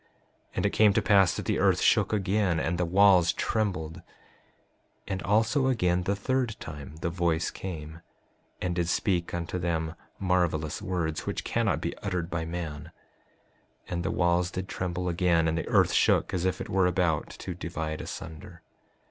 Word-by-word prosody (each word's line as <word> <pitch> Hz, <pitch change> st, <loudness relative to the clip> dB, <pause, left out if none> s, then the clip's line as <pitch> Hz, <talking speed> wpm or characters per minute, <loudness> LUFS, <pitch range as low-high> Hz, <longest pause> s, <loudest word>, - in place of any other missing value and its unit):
And -, -, 0 dB
it -, -, +2 dB
came 105 Hz, -2 st, +5 dB
to -, -, +2 dB
pass 95 Hz, -4 st, +4 dB
that -, -, -5 dB
the -, -, 0 dB
earth -, -, +3 dB
shook -, -, +3 dB
again, 100 Hz, -4 st, +1 dB
and 85 Hz, +2 st, -1 dB
the 90 Hz, -, +2 dB
walls 90 Hz, -1 st, +5 dB
trembled. 90 Hz, -7 st, -1 dB, 1.1 s
5:33 -, -, -10 dB
And 95 Hz, -1 st, -2 dB
also 115 Hz, +6 st, +2 dB
again 90 Hz, -8 st, +2 dB
the 100 Hz, -, +1 dB
third 125 Hz, +2 st, -1 dB
time 75 Hz, -1 st, -8 dB
the 85 Hz, -, -1 dB
voice 85 Hz, -1 st, 0 dB
came, 80 Hz, -3 st, -7 dB, 0.6 s
and 90 Hz, -, -1 dB
did 85 Hz, -1 st, -1 dB
speak 90 Hz, -2 st, 0 dB
unto 85 Hz, +1 st, -3 dB
them 80 Hz, -2 st, -1 dB, 0.2 s
marvelous 85 Hz, -5 st, 0 dB
words 90 Hz, -5 st, -2 dB
which -, -, -2 dB
cannot 105 Hz, -10 st, 0 dB
be 85 Hz, -, -3 dB
uttered 90 Hz, -4 st, -3 dB
by 80 Hz, -1 st, -2 dB
man; 80 Hz, -2 st, -5 dB, 1.0 s
and 85 Hz, -1 st, -2 dB
the -, -, -2 dB
walls 85 Hz, 0 st, +2 dB
did 95 Hz, +1 st, -5 dB
tremble 90 Hz, 0 st, -3 dB
again, 85 Hz, -1 st, +2 dB
and 80 Hz, -, 0 dB
the 85 Hz, -, -3 dB
earth -, -, +3 dB
shook -, -, +3 dB
as 90 Hz, -1 st, -1 dB
if 95 Hz, -, 0 dB
it -, -, -5 dB
were 95 Hz, -1 st, +2 dB
about 90 Hz, -4 st, 0 dB
to 90 Hz, -, -5 dB
divide 80 Hz, -3 st, -4 dB
asunder. 80 Hz, -2 st, -9 dB
90 Hz, 175 wpm, -28 LUFS, 80-95 Hz, 1.1 s, came